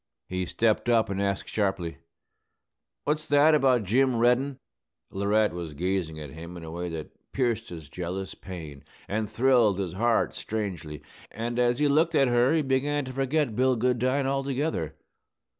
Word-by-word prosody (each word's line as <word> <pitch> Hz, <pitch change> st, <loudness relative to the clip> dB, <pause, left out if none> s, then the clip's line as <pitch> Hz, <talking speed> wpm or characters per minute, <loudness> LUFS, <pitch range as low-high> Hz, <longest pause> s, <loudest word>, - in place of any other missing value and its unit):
He 90 Hz, -1 st, -2 dB
stepped 115 Hz, +5 st, +1 dB
up 115 Hz, -4 st, +3 dB
and 100 Hz, 0 st, -1 dB
asked 100 Hz, -1 st, -1 dB
sharply, 95 Hz, -5 st, -1 dB, 1.1 s
"What's 150 Hz, +1 st, 0 dB
that 145 Hz, +2 st, +5 dB
about 130 Hz, -6 st, +4 dB
Jim 125 Hz, +6 st, +2 dB
Reddin?" 125 Hz, +4 st, +2 dB, 0.5 s
Laurette 100 Hz, 0 st, +1 dB
was 85 Hz, -4 st, -6 dB
gazing 90 Hz, -1 st, -2 dB
at 75 Hz, -3 st, -8 dB
him 85 Hz, +4 st, -9 dB
in 85 Hz, -, -9 dB
a 80 Hz, -, -7 dB
way 85 Hz, +1 st, -4 dB
that 80 Hz, -2 st, -9 dB
pierced 120 Hz, -4 st, 0 dB
his 80 Hz, -4 st, -9 dB
jealous 90 Hz, +4 st, -5 dB
pain 80 Hz, -7 st, -9 dB, 0.2 s
and 105 Hz, +1 st, -2 dB
thrilled 115 Hz, -3 st, +3 dB
his 95 Hz, -3 st, -3 dB
heart 115 Hz, +4 st, +1 dB
strangely; 90 Hz, -9 st, -5 dB, 0.3 s
and 120 Hz, +2 st, -3 dB
as 120 Hz, 0 st, +3 dB
he 150 Hz, +1 st, +2 dB
looked 160 Hz, +3 st, +3 dB
at 135 Hz, -3 st, +4 dB
her 120 Hz, +2 st, +3 dB
he 160 Hz, -, +2 dB
began 140 Hz, +2 st, 0 dB
to 130 Hz, -, -7 dB
forget 135 Hz, -2 st, 0 dB
Bill 130 Hz, +1 st, +3 dB
Goodine 125 Hz, +3 st, +1 dB
altogether. 135 Hz, -, -1 dB
115 Hz, 160 wpm, -27 LUFS, 90-130 Hz, 1.1 s, that